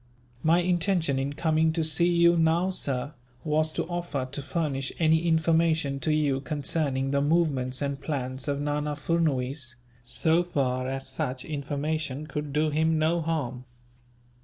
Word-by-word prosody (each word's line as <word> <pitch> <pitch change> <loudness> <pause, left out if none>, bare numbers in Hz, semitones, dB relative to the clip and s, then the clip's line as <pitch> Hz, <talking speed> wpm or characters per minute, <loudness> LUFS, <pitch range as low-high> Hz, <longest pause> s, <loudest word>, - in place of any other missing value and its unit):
"My 165 +3 +4
intention, 175 -5 +1
in 140 +2 -2
coming 160 0 +2
to 165 -1 0
see 160 +3 +3
you 170 0 +5
now, 165 +3 +2
sir, 140 -4 -3 0.3
was 155 0 +1
to - - -1
offer 170 -6 -3
to 140 - -4
furnish 140 -2 -2
any 160 +1 +3
information 160 -3 +2
to 155 +4 0
you, 145 -3 +1
concerning 140 -1 -1
the 140 0 +2
movements 145 -4 +1
and 140 -1 -3
plans 130 -3 -3
of 140 -1 -1
Nana 150 0 -1
Furnuwees, 140 -5 -1 0.3
so 160 +8 +2
far 130 -7 -1
as 135 0 -4
such 130 -1 -3
information 150 0 -3
could 150 -1 -5
do 150 +2 +1
him 160 +1 +2
no 160 +2 +2
harm." 135 -6 -3
150 Hz, 150 wpm, -27 LUFS, 135-160 Hz, 0.3 s, you